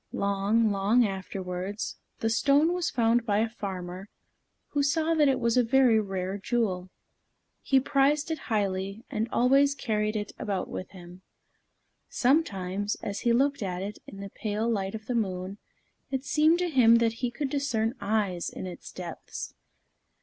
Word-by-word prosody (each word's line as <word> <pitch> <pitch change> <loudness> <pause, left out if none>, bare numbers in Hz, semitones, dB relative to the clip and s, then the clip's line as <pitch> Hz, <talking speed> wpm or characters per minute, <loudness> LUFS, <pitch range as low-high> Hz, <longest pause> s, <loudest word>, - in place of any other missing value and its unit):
Long, 200 +3 +1
long 205 +5 +3
afterwards, 190 0 -4 0.2
the 225 - +1
stone 285 +7 +3
was 355 -1 -1
found 235 0 +2
by 205 -3 +1
a 220 +2 +2
farmer, 190 -4 -6 0.6
who 290 - 0
saw 315 +3 +2
that 305 -2 +4
it 265 -1 +2
was 235 0 +1
a 250 - +5
very 240 -1 +4
rare 195 -1 -3
jewel. 195 -5 -1 0.7
He 270 - +3
prized 285 +3 +2
it 320 - -2
highly, 195 0 -1
and 220 +2 -1
always 275 +3 +4
carried 215 -5 -1
it 205 -1 -3
about 195 -3 -2
with 185 - -6
him. 180 -1 -13 0.9
Sometimes, 205 - +1
as 200 0 -3
he 240 - +1
looked 275 +3 +2
at 185 -2 -3
it 205 +2 -6
in 195 - -9
the 200 -1 -7
pale 215 +1 -2
light 195 -3 -1
of 215 0 -8
the 250 - -2
moon, 195 -3 -2 0.5
it 265 0 -3
seemed 310 +2 +4
to 355 0 -1
him 235 -5 +6
that 230 -1 +3
he 245 - +1
could 270 +2 -4
discern 240 -6 0
eyes 200 -4 0
in - - -7
its 180 -1 -8
depths. 175 -3 -7
220 Hz, 165 wpm, -28 LUFS, 195-260 Hz, 0.9 s, him